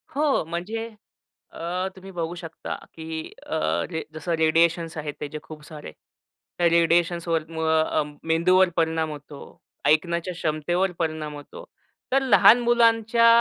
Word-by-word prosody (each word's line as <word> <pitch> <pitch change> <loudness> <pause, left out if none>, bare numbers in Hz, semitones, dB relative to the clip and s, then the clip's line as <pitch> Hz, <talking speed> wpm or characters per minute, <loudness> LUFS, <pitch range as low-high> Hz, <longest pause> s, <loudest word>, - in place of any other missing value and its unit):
हो. 290 - +2
म्हणजे 210 +8 -4 0.6
अ, 180 +3 -3
तुम्ही 190 +1 -11
बघू 170 -1 -4
शकता, 165 -2 -6 0.2
की 160 0 -6
अ, 160 - -1 0.3
जसं 155 +2 -5
रे 160 -1 +2
रेडिएशन्स 165 +1 +2
आहेत 150 -1 -4
त्याचे 150 +1 -5
खूप 155 -1 -11
सारे 155 - -9 0.7
रेडिएशन्सवर 170 -1 +2
म 160 -2 0
मेंदूवर 180 +3 +4
परिणाम 160 -1 +1
होतो. 145 -1 -10 0.5
ऐकण्याच्या 170 +4 +1
क्षमतेवर 175 +3 -1
परिणाम 155 -2 -2
होतो. - - -11 0.5
तर 270 +1 +3
लहान 245 -3 +6
मुलांच्या 230 -1 +4
165 Hz, 120 wpm, -24 LUFS, 160-185 Hz, 0.7 s, लहान